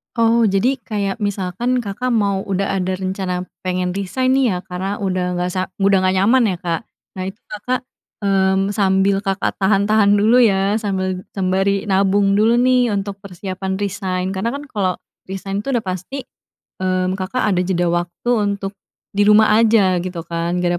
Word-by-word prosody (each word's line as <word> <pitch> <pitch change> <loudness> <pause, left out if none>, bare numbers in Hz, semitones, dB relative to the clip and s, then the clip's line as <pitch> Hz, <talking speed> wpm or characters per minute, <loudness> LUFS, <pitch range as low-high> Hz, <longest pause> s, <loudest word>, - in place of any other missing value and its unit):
Oh, 230 0 +3
jadi 215 +6 +2
kayak 205 -3 -3
misalkan 205 +5 -1
Kakak 240 +3 -3
mau 200 -3 +1
udah 195 -1 -1
ada 185 0 -2
rencana 185 -1 -3 0.2
pengen 180 -1 -1
resign, 235 +7 0
nih, 270 -1 +3
ya, 180 - -1
karena 190 +2 -5
udah 185 -2 -1
nggak 180 - 0
sa 185 - +1 0.2
udah 195 -1 +3
ngga 185 - +3
nyaman, 225 +2 +4
ya, 180 - -3
Kak. 170 -2 -2 0.3
Nah, 185 - -4
itu 210 - -34
Kakak, 245 +5 -2 0.4
mmm, 195 0 +1
sambil 195 -1 +2
Kakak 195 0 -1
tahan-tahan 200 +1 +3
dulu, 235 +4 +5
ya, 195 -1 +2
sambil 190 -4 -2
sembari 195 +2 0
nabung 195 +1 +3
dulu, 225 +3 +4
nih, 250 -2 +3
untuk 200 -1 -4
persiapan 190 0 -5
resign. 190 -2 -2
Karena, 225 +5 -1
kan, 285 +2 -6
kalau 195 -7 -1 0.3
resign, 195 +1 -4
tuh, 275 - -3
udah 240 -3 0
pasti, 185 +9 -5 0.5
mmm, 185 0 0
Kakak 190 +7 -2
ada 200 -4 +1
jeda 175 -1 +1
waktu 175 +7 -2
untuk 200 -3 -1 0.3
di 205 +1 +1
rumah 210 0 +6
aja, 215 -5 +4
gitu, 175 -1 -5
kan, 170 +1 -3
nggak 175 0 +1
195 Hz, 165 wpm, -19 LUFS, 185-210 Hz, 0.5 s, rumah